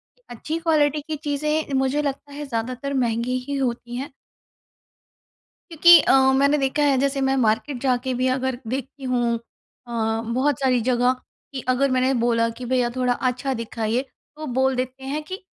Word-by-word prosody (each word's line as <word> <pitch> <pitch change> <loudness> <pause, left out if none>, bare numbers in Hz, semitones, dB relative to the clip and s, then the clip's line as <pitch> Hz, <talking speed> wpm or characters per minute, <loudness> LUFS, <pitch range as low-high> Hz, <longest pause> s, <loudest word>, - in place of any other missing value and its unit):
कि - - -35
अच्छी 305 +7 -4
क्वालिटी 305 -3 +2
की 315 - -2
चीज़ें 300 0 -2
मुझे 265 +2 +1
लगता 285 0 -4
है 295 +1 -6
ज़्यादातर 255 +2 -3
महँगी 245 -1 0
ही 285 - -2
होती 240 -2 -3
हैं। 270 +2 -6 1.6
क्योंकि 340 +1 +8
अ, 265 0 +4
मैंने 280 +2 +3
देखा 280 +1 0
है 280 -2 +3
जैसे 275 +1 0
मैं 270 0 +2
मार्केट 235 +4 +1
जाके 255 -1 0
भी 255 +1 0
अगर 260 -1 -2
देखती 270 +3 -5
हूँ 240 -2 +1
अ, 230 -1 -5
बहुत 265 +2 +1
सारी 260 -2 +2
जगह 245 +1 +2 0.4
कि 260 - -4
अगर 265 +2 +2
मैंने 255 +1 +2
बोला 230 -1 +2
कि, 240 +2 -8
"भैया 250 -1 +1
थोड़ा 250 -1 +1
अच्छा 255 +2 -1
दिखाइए।" 230 0 -2 0.3
तो 310 +1 -7
बोल 265 0 +2
देते 255 +1 -4
हैं 280 +3 -3
कि, 375 +5 -7
260 Hz, 170 wpm, -23 LUFS, 245-280 Hz, 1.6 s, क्योंकि